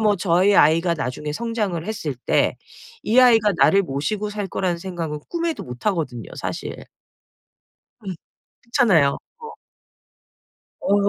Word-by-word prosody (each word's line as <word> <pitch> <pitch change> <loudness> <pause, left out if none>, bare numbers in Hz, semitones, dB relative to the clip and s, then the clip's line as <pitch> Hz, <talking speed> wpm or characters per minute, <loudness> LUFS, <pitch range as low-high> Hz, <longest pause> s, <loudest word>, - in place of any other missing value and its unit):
뭐 210 -2 +3
저희 185 +2 +3
아이가 165 +3 +4
나중에 150 +1 -4
성장을 210 -5 -2
했을 165 -10 -3
때 - - +2 0.5
이 230 +4 +2
아이가 225 -4 +5
나를 195 +8 +5
모시고 195 +8 -2
살 205 -1 -4
거라는 180 -2 -1
생각은 170 -4 -5
꿈에도 335 -1 -2
못하거든요, 125 - -3
사실. - - -5 1.3
음. 190 - -3 0.5
그렇잖아요. 210 - +3 0.2
어. 460 -1 -9 1.3
어 200 - +2
185 Hz, 265 characters per minute, -22 LUFS, 155-215 Hz, 1.3 s, 아이가